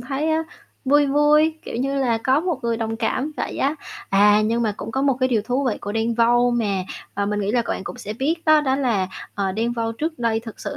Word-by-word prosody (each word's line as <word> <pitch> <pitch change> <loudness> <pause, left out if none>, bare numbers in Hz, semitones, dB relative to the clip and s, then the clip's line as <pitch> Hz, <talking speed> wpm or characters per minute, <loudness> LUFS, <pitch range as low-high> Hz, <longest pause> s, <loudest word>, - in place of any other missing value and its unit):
thấy 275 +5 -2
á, 315 0 +1 0.4
vui 290 +2 +4
vui, 300 +3 +3
kiểu - - -6
như 270 +3 -1
là, 235 -4 +1
có 260 +5 +2
một 345 -4 -2
người 235 -1 0
đồng 225 -1 -3
cảm 285 +6 -1
vậy - - -3
á. 285 +3 +1 0.4
À, 205 +2 +5
nhưng 230 +2 0
mà 215 -2 0
cũng 220 - -6
có 265 +4 -1
một 275 -2 +2
cái 255 - +3
điều 225 -4 +1
thú 250 +5 -1
vị 240 - -1
của 205 - -5
Đen 225 +1 0
Vâu 240 +1 +3
mà, 210 -6 0 0.3
ờ, 200 0 -1
mình 210 0 -1
nghĩ 200 0 -1
là 240 -1 +2
c - - -13
bạn - - -3
cũng - - -7
sẽ 210 - -5
biết 275 +9 0
đó, 310 -1 +6
đó 265 -2 +1
là, 230 -9 0 0.3
ờ, 195 -2 -1
Đen 230 +4 -1
Vâu 230 -1 -2
trước 310 +6 -4
đây 230 -2 0
thực 225 -1 -10
sự - - -5
240 Hz, 260 wpm, -22 LUFS, 220-275 Hz, 0.4 s, đó